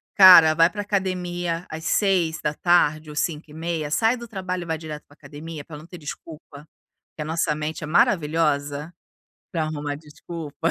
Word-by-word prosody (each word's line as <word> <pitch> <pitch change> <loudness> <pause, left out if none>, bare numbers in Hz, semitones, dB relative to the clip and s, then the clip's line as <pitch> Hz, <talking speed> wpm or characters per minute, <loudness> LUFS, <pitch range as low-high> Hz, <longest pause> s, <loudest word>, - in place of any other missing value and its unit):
Cara, 180 -5 +9
vai 165 +2 +5
pra 205 +3 -5
academia 180 -4 -2
às 160 +1 -7
18h 165 -4 +1
ou 150 - -9
17h30. 155 0 -3
Sai 225 +8 +2
do 235 -1 -9
trabalho 185 -3 -4
e - - -10
vai 160 -1 -2
direto 155 -1 -8
pra - - -21
academia, 150 +1 -9
pra 155 - -10
não 155 - -12
ter 175 +1 -11
desculpa, 150 -1 -10 0.5
porque 155 - -7
a - - -4
nossa 160 0 0
mente 155 +1 -4
é - - -4
maravilhosa 150 -2 +1 0.6
pra 165 -3 0
arrumar 150 -2 -4
desculpa. 150 +1 -5
160 Hz, 165 wpm, -23 LUFS, 150-175 Hz, 0.6 s, Cara